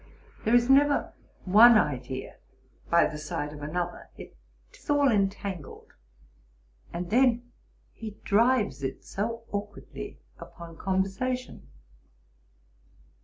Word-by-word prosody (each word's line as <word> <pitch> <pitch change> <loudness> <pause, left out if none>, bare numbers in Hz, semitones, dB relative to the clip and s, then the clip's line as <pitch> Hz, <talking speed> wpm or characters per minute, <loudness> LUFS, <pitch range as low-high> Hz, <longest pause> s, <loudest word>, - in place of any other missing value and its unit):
There 225 +2 +4
is 240 0 +4
never 285 +2 +3 0.3
one 220 +5 +8
idea 130 -6 -2 0.5
by 170 0 +5
the 150 - -4
side 150 -1 -4
of 145 - -10
another; 175 +4 -4
'tis - - -17
all 285 -2 +4
entangled: 195 -5 -3 1.0
and 175 +1 -5
then 245 0 +2 0.4
he 215 -2 -8
drives 215 - +2
it 135 -1 -5
so 230 +3 -4
aukwardly 205 0 -6 0.2
upon 170 -1 -11
conversation.' 195 +8 -2
205 Hz, 100 wpm, -27 LUFS, 170-240 Hz, 1.0 s, one